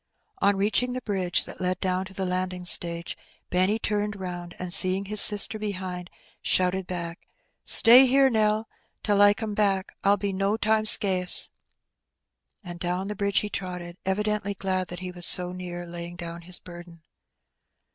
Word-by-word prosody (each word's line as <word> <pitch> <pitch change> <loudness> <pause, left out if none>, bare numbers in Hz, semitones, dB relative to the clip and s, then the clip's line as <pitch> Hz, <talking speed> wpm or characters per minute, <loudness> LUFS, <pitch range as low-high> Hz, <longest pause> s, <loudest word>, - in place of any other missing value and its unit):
On 200 - +2
reaching 215 +5 -1
the 255 - -5
bridge 190 -4 -1
that - - -11
led 180 0 -2
down 185 0 -2
to 190 - -13
the 190 - -3
landing 180 0 -4
stage, 170 -1 +1 0.4
Benny 185 +4 +1
turned 210 -1 -3
round, 175 -2 -8
and, 180 -1 -1
seeing 190 +1 +4
his 210 +1 +5
sister 210 +1 +5
behind, 185 -4 -6 0.3
shouted 185 0 -1
back. 170 -1 -7 0.5
Stay 250 +2 +8
here, 270 +2 +3
Nell, 215 -2 -1 0.4
till 205 -1 +1
I 205 0 +5
come 215 0 -6
back 195 -2 -1
— - - -48
I'll 200 +1 +2
be 200 0 -4
no 195 +3 -2
time 220 0 0
it - - +7
Hee 205 - -3
Bennt. 185 -1 -2
'ce." - - +3 1.1
And 175 -2 -10
down 180 +3 -4
the 210 - -5
bridge 200 0 0
he 210 - -6
trotted, 180 -2 -7
evidently 205 +1 -3
frlad 185 -2 -3
he 180 0 -8
was 175 -1 -1
so 180 -1 +4
near 175 -1 -8
laying 170 0 -9
down 170 -1 -9
his 175 +1 0
burden. 175 -2 -14
185 Hz, 175 wpm, -24 LUFS, 180-205 Hz, 1.1 s, Stay